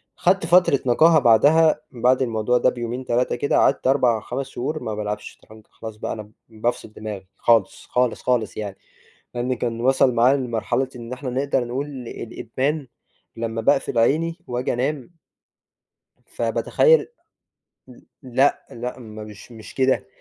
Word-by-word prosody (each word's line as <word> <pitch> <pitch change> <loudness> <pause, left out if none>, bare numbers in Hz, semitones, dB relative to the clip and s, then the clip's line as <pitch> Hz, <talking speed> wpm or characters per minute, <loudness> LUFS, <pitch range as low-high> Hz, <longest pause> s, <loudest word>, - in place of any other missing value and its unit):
خدت 185 -1 +2
فترة 175 -5 +4
نقاهة 155 +6 +5
بعدها 145 +7 +5
بعد 125 +2 +2
الموضوع 115 0 +1
ده - - +4
بيومين 120 +2 -5
3 120 +1 0
كده، 140 - 0
قعدت 135 - +2
4، 125 -5 +3
5 135 +2 -4
شهور 150 +5 -4
ما 110 -1 -3
بالعبش 105 0 -4
شطرنج، 110 0 -18
خلاص 110 -1 -9
بقى - - -4
أنا 105 -1 -9 0.2
بافصِل 110 -1 -3
دماغي 105 -3 -7
خالص، 115 -5 +2
خالص، 125 -2 0
خالص 125 -4 0
يعني، 100 -2 -5 0.6
لإن 120 +1 -1
كان 115 -1 -3
وصَل 130 0 +3
معايا 125 +4 +4
لمرحلة 125 +1 -1
إن 120 0 -7
إحنا 130 +1 -5
نقدر 135 0 0
نقول 130 +4 -3 0.2
الإدمان، 130 +6 -3 0.5
لمّا 115 0 -3
باقفل 125 +1 +1
عيني 160 +8 +2
واجي 125 +1 -2
أنام 135 +4 -2 1.1
فباتخيَّل 480 -1 +2 0.8
ل - - -15 0.2
لأ، 130 +3 +1
لأ، 125 +2 -6
مش 110 -1 -11
مش 110 -2 -12
كده، 130 0 +1
125 Hz, 145 wpm, -22 LUFS, 115-135 Hz, 1.1 s, نقاهة